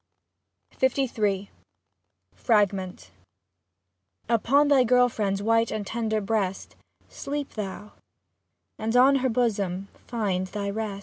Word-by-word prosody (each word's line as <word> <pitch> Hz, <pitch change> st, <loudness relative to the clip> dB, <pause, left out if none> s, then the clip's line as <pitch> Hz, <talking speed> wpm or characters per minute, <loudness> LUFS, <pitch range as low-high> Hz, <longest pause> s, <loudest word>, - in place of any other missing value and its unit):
LIII 220 Hz, -7 st, 0 dB, 0.8 s
FRAGMENT 190 Hz, -, 0 dB, 1.2 s
Upon 240 Hz, +6 st, +3 dB
thy 280 Hz, -3 st, +5 dB
girl 250 Hz, +1 st, +4 dB
friend's 200 Hz, -3 st, -2 dB
white 230 Hz, +1 st, +2 dB
and 215 Hz, -2 st, -4 dB
tender 220 Hz, 0 st, -1 dB
breast, 195 Hz, -2 st, -2 dB, 0.3 s
Sleep 285 Hz, 0 st, -5 dB
thou, 210 Hz, 0 st, -6 dB, 0.9 s
and 225 Hz, +2 st, -2 dB
on 270 Hz, +2 st, +6 dB
her 260 Hz, 0 st, 0 dB
bosom 200 Hz, -5 st, -1 dB, 0.2 s
find 195 Hz, -6 st, -1 dB
thy 200 Hz, +1 st, -4 dB
rest. 210 Hz, -2 st, -4 dB
220 Hz, 105 wpm, -26 LUFS, 200-245 Hz, 1.2 s, on